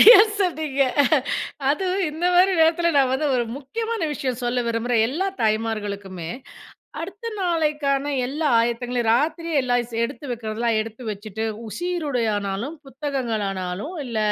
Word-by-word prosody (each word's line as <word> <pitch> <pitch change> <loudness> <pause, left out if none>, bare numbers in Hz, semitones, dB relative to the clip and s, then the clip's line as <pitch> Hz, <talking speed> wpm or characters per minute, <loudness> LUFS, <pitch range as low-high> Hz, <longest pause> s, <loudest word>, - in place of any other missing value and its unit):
சரியா 455 -2 +11 0.2
சொன்னீங்க. 310 -7 +1 0.9
அதுவும் 375 +4 0
இந்த 320 +3 -4
மாரி 370 +2 +6
நேரத்தில, 335 +1 +4
நான் 260 -1 +3
வந்து 295 +3 +1
ஒரு 240 - +1
முக்கியமான 445 - -3
விஷயம் 255 -3 -3
சொல்ல 245 0 +1
விரும்புறேன், 230 0 +1
எல்லா 335 +9 -1 0.2
தாய்மார்களுக்குமே. 205 -5 -2 0.7
அடுத்த 390 +7 -7
நாளைக்கான 300 -6 +1 0.2
எல்லா 295 +5 -2
ஆயத்தங்களையும், 240 +1 0
ராத்திரியே 320 +5 0
எல்லாம் 245 -2 +1
ஸ் - - -9
எடுத்து 235 +4 -6
வைக்கிறதுலாம், 230 -1 -1
எடுத்து 225 +2 -6
வச்சுட்டு, 210 +1 -5 0.2
உ - - -7
சீருடையானாலும், 245 - -1
புத்தகங்களானாலும், 230 - -3
இல்ல, 235 -3 -3
255 Hz, 125 wpm, -23 LUFS, 225-320 Hz, 0.9 s, சரியா